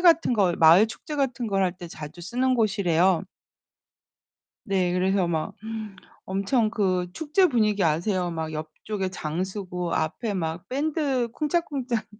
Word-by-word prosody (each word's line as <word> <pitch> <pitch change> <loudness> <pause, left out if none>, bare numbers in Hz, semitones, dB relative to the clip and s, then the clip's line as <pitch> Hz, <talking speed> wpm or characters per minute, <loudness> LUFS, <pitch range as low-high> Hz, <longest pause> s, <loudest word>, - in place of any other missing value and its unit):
같은 330 -6 +5
거, 190 -6 +3
마을 165 +6 +7
축제 295 +6 -8
같은 255 -4 -1
걸 195 -2 +1
할 180 - +1
때 175 -2 -8
자주 155 +2 -9
쓰는 255 +8 +1
곳이래요. 190 -5 +2 1.4
네, 185 -3 +1
그래서 185 0 +2
막 160 -2 -2 0.7
엄청 200 +4 +1
그 185 -5 0
축제 320 - +2
분위기 215 - +2
아세요? 175 +3 +1
막 160 -1 -4
옆쪽에 185 +6 -4
장 165 0 -3
서고, 180 -3 -4
앞에 205 +8 -1
막 165 -2 -3
밴드 280 -3 0
쿵짝쿵짝 280 -8 -1
195 Hz, 255 characters per minute, -25 LUFS, 175-245 Hz, 1.4 s, 마을